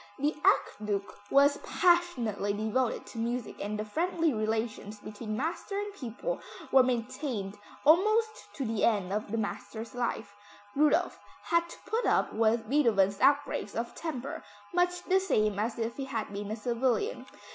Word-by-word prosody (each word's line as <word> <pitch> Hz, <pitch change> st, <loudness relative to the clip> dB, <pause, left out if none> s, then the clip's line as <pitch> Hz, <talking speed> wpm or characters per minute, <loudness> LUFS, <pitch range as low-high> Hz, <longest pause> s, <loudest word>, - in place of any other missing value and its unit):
The 295 Hz, +3 st, 0 dB
Archduke 205 Hz, -1 st, +1 dB, 0.2 s
was 285 Hz, +1 st, +5 dB
passionately 305 Hz, -, +1 dB
devoted 220 Hz, +4 st, 0 dB
to 230 Hz, -, -8 dB
music 235 Hz, -1 st, -3 dB
and 210 Hz, +1 st, -3 dB
the 215 Hz, -, -3 dB
friendly 330 Hz, -, 0 dB
relations 215 Hz, -1 st, -2 dB
between 215 Hz, +1 st, -6 dB
master 335 Hz, -, -3 dB
and 410 Hz, 0 st, -4 dB
pupil 295 Hz, -, -4 dB, 0.3 s
were 265 Hz, -, +8 dB
maintained 250 Hz, -4 st, -2 dB, 0.3 s
almost 430 Hz, +8 st, +3 dB
to 275 Hz, -, -3 dB
the 220 Hz, -2 st, -1 dB
end 200 Hz, -4 st, +2 dB
of 210 Hz, 0 st, -2 dB
the 230 Hz, -, -2 dB
master's 220 Hz, +1 st, -4 dB
life. 230 Hz, -4 st, -2 dB, 0.4 s
Rudolph 300 Hz, +1 st, +3 dB, 0.2 s
had 340 Hz, 0 st, +1 dB
to -, -, -10 dB
put 445 Hz, +5 st, 0 dB
up -, -, +2 dB
with 225 Hz, 0 st, +2 dB
Beethoven's 210 Hz, -8 st, +3 dB
outbreaks 280 Hz, -6 st, +2 dB
of 235 Hz, +1 st, -3 dB
temper 280 Hz, -5 st, -5 dB, 0.3 s
much 355 Hz, 0 st, +1 dB
the 380 Hz, +1 st, +3 dB
same 215 Hz, -, +1 dB
as 220 Hz, +2 st, -1 dB
if 230 Hz, 0 st, -3 dB
he 275 Hz, -, -3 dB
had 225 Hz, -6 st, -4 dB
been 200 Hz, 0 st, -4 dB
a 215 Hz, -, -2 dB
civilian. 245 Hz, -, -1 dB
235 Hz, 155 wpm, -30 LUFS, 215-310 Hz, 0.4 s, were